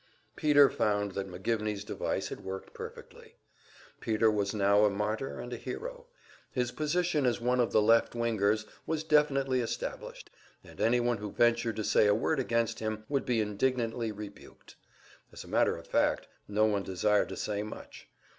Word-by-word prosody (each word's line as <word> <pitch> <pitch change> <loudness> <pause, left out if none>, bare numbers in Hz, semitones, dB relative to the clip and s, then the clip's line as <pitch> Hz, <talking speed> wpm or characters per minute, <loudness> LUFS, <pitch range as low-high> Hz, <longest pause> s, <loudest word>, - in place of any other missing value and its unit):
Peter 145 -2 +6
found 105 -7 0
that 95 0 -4
McGivney's 105 +2 -2
device - - -3
had - - -8
worked 95 0 -7
perfectly. - - -10 0.6
Peter 110 0 +2
was 100 -2 0
now 100 0 +3
a 105 - +5
martyr 105 +5 -3
and 120 0 -6
a - - -4
hero; - - -7 0.4
his 125 -1 -1
position 155 0 0
as 120 - +1
one 125 +1 +1
of 120 - +2
the 110 - +4
"left 115 +2 +4
wingers" 110 -2 +1 0.2
was 160 -1 -1
definitely 140 -4 +2
established, 115 - -5 0.3
and - - -11
anyone 120 0 +2
who 105 0 -6
ventured 120 0 +2
to 110 - -3
say 105 - +4
a 105 - +4
word 135 +7 0
against 115 -3 0
him 110 -1 -3
would 140 -1 -1
be 120 -3 +2
indignantly 115 +1 -1
rebuked. 105 -1 -11 0.6
As - - -9
a - - -14
matter - - +2
of - - -11
fact, - - +1 0.2
no 105 +1 +2
one 105 -2 +1
desired 95 +2 +1
to - - -6
say 105 -1 -2
much. 105 - -9
115 Hz, 170 wpm, -30 LUFS, 105-125 Hz, 0.6 s, Peter